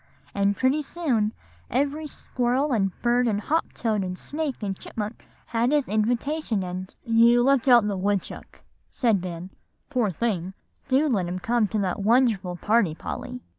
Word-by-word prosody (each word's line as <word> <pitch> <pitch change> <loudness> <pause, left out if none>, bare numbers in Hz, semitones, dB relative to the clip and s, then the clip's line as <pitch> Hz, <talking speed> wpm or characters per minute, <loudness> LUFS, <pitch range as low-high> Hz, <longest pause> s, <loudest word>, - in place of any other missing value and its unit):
And 200 0 +1
pretty 260 +6 +2
soon 270 -9 0 0.4
every 285 +4 -1
squirrel 260 +1 -1
and 195 -5 0
bird 240 +1 +3
and 205 -3 +1
hop 320 +10 -1
toad 215 -4 -1
and 185 0 -4
snake 290 -3 -4
and 195 -2 -2
chipmunk 215 +3 -6 0.2
had 235 +3 0
his 295 -2 +2
invitation, 230 +2 0
and" 185 +1 -5
"You 235 +1 +5
left 275 -1 +3
out 240 -4 +6
the 205 - -1
woodchuck," 195 +1 -3 0.3
said 225 -7 +1
Ben; 180 +1 -6 0.4
"poor 245 -6 +1
thing, 190 -1 -2 0.3
do 275 +3 +3
let 200 -10 0
him 180 +1 -3
come 225 +3 +1
to 215 - -2
that 190 0 -1
wonderful 215 -5 +2
party, 205 -3 +2
Polly." 250 +7 -6
230 Hz, 160 wpm, -25 LUFS, 195-255 Hz, 0.4 s, out